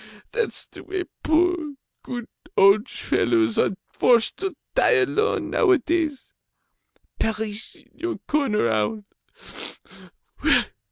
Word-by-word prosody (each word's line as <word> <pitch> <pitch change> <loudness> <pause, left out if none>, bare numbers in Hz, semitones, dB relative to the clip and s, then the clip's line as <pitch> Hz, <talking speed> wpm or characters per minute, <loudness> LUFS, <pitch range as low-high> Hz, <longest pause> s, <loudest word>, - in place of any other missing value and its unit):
That's 475 -3 -2
the - - -13
way 375 -1 -3 0.2
poor, 320 -2 +1 0.3
good 240 -2 -6 0.3
old 200 +2 +5
fellows 115 -2 +1
are 190 - +1 0.2
forced 235 -3 +3
to 385 -3 -3 0.2
die - - +4
alone, 430 +3 0
nowadays. 330 - +1 0.9
Perish 220 0 -3
in - - -22
your 350 0 -4
corner, 275 - +1
owl! 110 - 0
270 Hz, 100 wpm, -24 LUFS, 210-350 Hz, 0.9 s, old